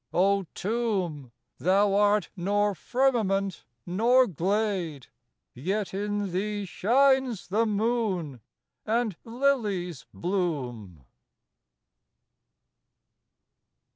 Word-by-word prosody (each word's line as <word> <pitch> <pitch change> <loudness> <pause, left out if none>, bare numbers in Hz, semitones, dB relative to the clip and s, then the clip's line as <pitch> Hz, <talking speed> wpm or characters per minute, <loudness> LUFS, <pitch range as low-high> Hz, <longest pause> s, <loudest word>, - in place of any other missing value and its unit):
O 195 0 +3
Tomb, 190 - -2 0.3
thou 195 +3 +3
art 205 +1 +3
nor 205 +3 +1
firmament 200 -4 0 0.2
nor 235 +8 +4
glade, 185 - -1 0.5
Yet 190 - -2
in 205 0 -2
thee 205 +3 -2
shines 255 +3 +2
the 220 +4 +2
moon 205 - -1 0.4
and 225 -3 0
lilies 225 - -1
bloom. 125 - -3
200 Hz, 75 wpm, -27 LUFS, 175-220 Hz, 0.5 s, nor